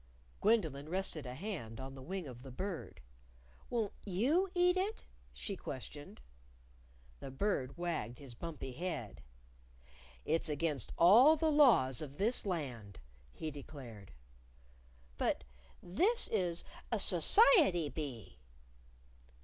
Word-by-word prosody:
Gwendolyn 160 - +1
rested 175 -6 -1
a 125 - -6
hand 145 - -6
on 135 0 -7
the 135 - -10
wing 185 +6 -5
of 125 -2 -10
the 135 - -10
Bird. 180 +7 -6 0.7
"Won't 225 -4 -1
you 265 - +1
eat 355 0 +4
it?" 400 +4 -2 0.3
she 200 - -5
questioned. 145 - -8 1.0
The - - -7
Bird 135 -2 -1
wagged 170 -9 -3
his 135 -4 -11
bumpy 150 0 -6
head. 140 - -5 1.0
"It's 160 +1 +1
against 150 -5 -1
all 235 - +8
the 315 0 +1
laws 195 - +5
of 145 -2 -8
this 215 +1 +1
Land," 125 - -4 0.3
he 155 - -5
declared. 130 - -10 1.1
"But - - 0 0.4
this 390 - +1
is 175 -2 -1 0.3
a - - +2
society 315 - +5
bee." 130 - -7
165 Hz, 115 wpm, -35 LUFS, 135-210 Hz, 1.1 s, all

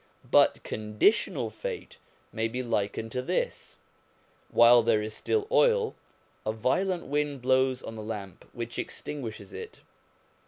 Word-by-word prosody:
But - - +5
conditional 110 - +1
fate - - -6 0.3
may 110 0 0
be 125 +3 -3
likened 115 -1 -2
to 125 - -2
this: 125 - -2 0.7
while 120 +1 +7
there 115 -1 +3
is 110 0 -4
still 425 - -1
oil, 485 -2 +4 0.5
a 110 - 0
violent 175 - 0
wind 145 -2 -1
blows 130 0 +2
on - - -6
the 110 - -6
lamp, 105 -4 -7
which 115 0 -5
extinguishes 115 -9 -6
it. - - -8
120 Hz, 130 wpm, -28 LUFS, 110-150 Hz, 0.7 s, while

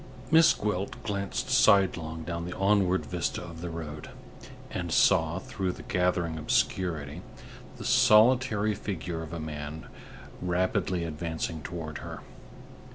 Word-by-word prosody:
Miss 165 +1 +7
Gwilt 100 -2 -2
glanced 105 +4 -3
sidelong 95 -9 +3
down 85 +1 -4
the 90 - -6
onward 95 -2 +2
vista 90 -1 -2
of 85 -2 -9
the 90 - -4
road, 75 -2 -7 0.6
and - - -4
saw, 80 +2 +4
through 95 -1 -3
the - - -11
gathering 85 -3 0
obscurity, 80 -1 -1 0.6
the - - -8
solitary 110 -1 +4
figure 90 -5 -4
of 80 -1 -8
a 85 - -5
man 75 0 -6 0.6
rapidly 90 0 0
advancing 80 0 -4
toward 80 -2 -6
her. - - -8
90 Hz, 125 wpm, -28 LUFS, 80-100 Hz, 0.6 s, Miss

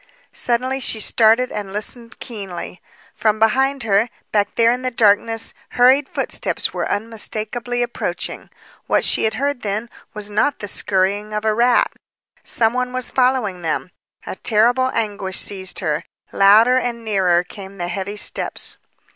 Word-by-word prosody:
Suddenly 255 +2 0
she 230 -3 0
started 225 +3 +3
and 205 -2 -5
listened 230 +3 -3
keenly. 195 -6 -7 0.3
From 215 -1 +1
behind 265 +5 +2
her, 215 +2 +2 0.2
back 205 -1 +1
there 230 0 +4
in 250 +1 -1
the 255 - -1
darkness, 225 0 +2 0.2
hurried 260 +3 +5
footsteps - - -1
were - - -2
unmistakably 225 +2 -2
approaching. 240 - -4 0.4
What - - +2
she - - +2
had 220 - 0
heard, 280 -2 -1
then, 215 +3 -3 0.2
was 210 -1 -4
not 260 +7 +1
the 205 - -5
scurrying 200 +2 0
of 210 +1 -2
a 215 - +3
rat. 240 +2 +3 0.5
Some 225 0 +1
one 250 0 -2
was 255 -1 -3
following 250 -8 +1
them. 170 +2 -2 0.3
A - - -5
terrible 245 +4 +3
anguish 200 -4 -2
seized 190 -2 -3
her. 150 -5 -1 0.3
Louder 220 +6 +6
and 235 -2 -2
nearer 185 -5 +2
came 195 +1 -11
the 175 -1 -3
heavy 195 +3 -4
steps. 210 - -3
220 Hz, 150 wpm, -20 LUFS, 200-245 Hz, 0.5 s, Louder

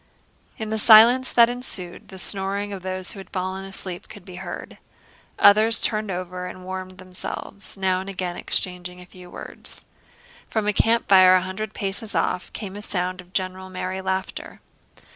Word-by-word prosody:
In 220 -1 -5
the 220 - 0
silence 235 +4 +7
that 235 -1 +7
ensued, 230 -8 -6
the 190 - -11
snoring 200 +1 -2
of 190 - -6
those 185 0 -3
who 205 - -9
had 190 - -11
fallen 190 0 -3
asleep 190 -2 -7
could 200 -3 -12
be 180 -2 -10
heard. - - -7 0.6
Others 215 +2 +7
turned 215 -2 +1
over 180 0 -4
and 185 0 -9
warmed 185 0 -6
themselves, 185 +2 -6
now 190 -1 +1
and 190 +1 -6
again 185 -2 -3
exchanging 180 0 -2
a 180 - -11
few 180 0 -14
words. - - -9 0.6
From 220 -2 -1
a 210 - +2
campfire 195 -4 +6
a 185 - +3
hundred 210 +3 -5
paces 200 +2 -3
off 180 - 0
came 200 -3 -6
a 205 - -6
sound 185 -3 -2
of 180 0 -21
general, 185 0 -3
merry 185 0 -4
laughter. 190 0 -4
190 Hz, 170 wpm, -24 LUFS, 185-205 Hz, 0.6 s, silence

